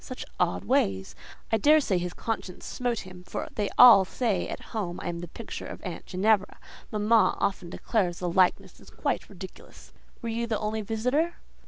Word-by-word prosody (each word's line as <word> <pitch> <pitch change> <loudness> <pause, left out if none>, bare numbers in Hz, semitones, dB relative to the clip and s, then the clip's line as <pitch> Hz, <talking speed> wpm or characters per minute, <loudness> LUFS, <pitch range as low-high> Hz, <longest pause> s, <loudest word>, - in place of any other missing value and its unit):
Such - - -7
odd 90 +1 +1
ways! 95 -1 0 0.4
I 225 - +4
daresay 290 -8 +4
his 175 0 -4
conscience 220 -5 -4
smote 245 -2 -2
him, 185 -1 -12
for - - -5
they 205 -2 -1
all 235 -6 +10
say 200 0 -1
at - - -5
home 185 -6 -3
I - - -4
am 170 0 -4
the 175 - -6
picture 220 +6 -7
of - - -8
aunt 180 -4 -7
Ginevra. 200 +2 +1 0.3
Mamma 215 +1 +3
often 190 -3 -1
declares 180 -2 -1
the 180 - -3
likeness 180 +1 +1
is - - -16
quite - - -3
ridiculous." - - -12 0.3
"Were 230 - -2
you 230 +1 -2
the 220 -2 0
only 215 +1 -2
visitor?" 250 - 0
205 Hz, 180 wpm, -27 LUFS, 180-230 Hz, 0.4 s, all